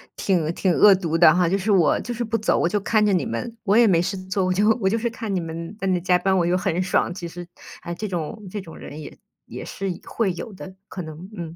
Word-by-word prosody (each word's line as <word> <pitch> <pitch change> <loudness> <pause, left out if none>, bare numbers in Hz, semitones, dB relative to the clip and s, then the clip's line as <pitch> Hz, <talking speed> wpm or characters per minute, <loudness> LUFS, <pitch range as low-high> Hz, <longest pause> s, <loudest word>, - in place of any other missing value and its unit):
挺 170 -5 0
挺 185 - +1
恶 200 +4 +7
毒 165 -3 -1
的 165 -2 +7
哈， 180 -1 +2
就 195 - +2
是 200 +2 -1
我 175 -6 +4
就 240 - -5
是 240 - -3
不 230 0 -1
走， 220 - +1
我 - - +2
就 205 +2 0
看 215 +1 +2
着 205 - +3
你 180 - +1
们， 230 0 -5
我 200 0 +2
也 235 0 +6
没 170 -4 +4
事 195 +3 -2
做， 190 0 0
我 185 - +1
就 205 +4 +3
我 190 - +2
就 225 - +1
是 235 +1 -1
看 225 -2 -5
你 185 - +1
们 165 +3 -6
在 195 - -2
那 185 -1 +2
加 180 0 +3
班 190 +1 +1
我 170 - +2
又 175 +1 +2
很 185 -2 -1
爽， 185 - +1
其 175 -2 -6
实， 175 +1 -9 0.3
啊， 170 - -5
这 215 +5 -5
种 190 +3 -5
这 205 0 -4
种 165 -3 -12
人 150 +2 -9
也 - - -10 0.3
也 - - -8
是 195 0 -4 0.2
会 220 -5 -1
有 200 +4 -7
的， 190 0 -10
可 185 - -6
能， 160 +3 -9
嗯。 165 -3 -7
185 Hz, 295 characters per minute, -23 LUFS, 170-210 Hz, 0.3 s, 恶